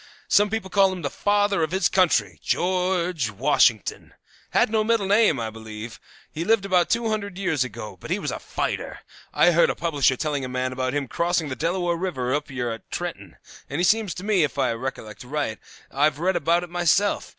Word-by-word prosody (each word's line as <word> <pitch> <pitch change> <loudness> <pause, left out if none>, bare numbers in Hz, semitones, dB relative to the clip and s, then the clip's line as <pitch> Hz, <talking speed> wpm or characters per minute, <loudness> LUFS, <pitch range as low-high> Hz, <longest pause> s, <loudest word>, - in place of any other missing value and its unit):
Some 205 +1 +4
people 220 -3 -4
call 195 -1 +4
him 180 -2 -6
Father 205 +5 +1
of 160 - +1
his 190 -1 +2
Country. 110 - +2
George 180 -6 0
Washington. 115 -1 +1 0.3
Had - - +2
no 220 -1 +2
middle 225 -2 +1
name, 200 - +3
I 110 -1 -3
believe. 110 +1 -9 0.3
He 160 - -4
lived 215 +1 +2
about 180 -3 +2
two 230 -1 +1
hundred 200 -4 -3
years 175 -9 0
ago, 105 -5 -8
and - - -9
he - - +1
was - - -3
a - - -5
fighter. - - -4 0.3
I 175 - +4
heard 170 0 +4
the - - -1
publisher 145 -6 +1
telling 145 -2 -2
a 130 - -4
man 130 0 -2
about 130 +1 -2
him 145 -2 -1
crossing 170 +1 0
the 130 - -3
Delaware 175 +4 0
River 130 -9 -2
up 145 0 -2
yer 125 -3 -3
at 115 - -9
Trenton, - - -6 0.3
and 160 +6 0
seems 215 -3 +2
to 180 - -7
me, 205 -5 +3
if 145 - -2
I - - +2
recollect 115 -3 -6
right, 130 -4 -3 0.3
I've 145 +1 +2
read 180 +4 0
about 170 +1 +2
it 175 - -9
myself. 175 +3 +1
165 Hz, 200 wpm, -24 LUFS, 130-190 Hz, 0.3 s, Some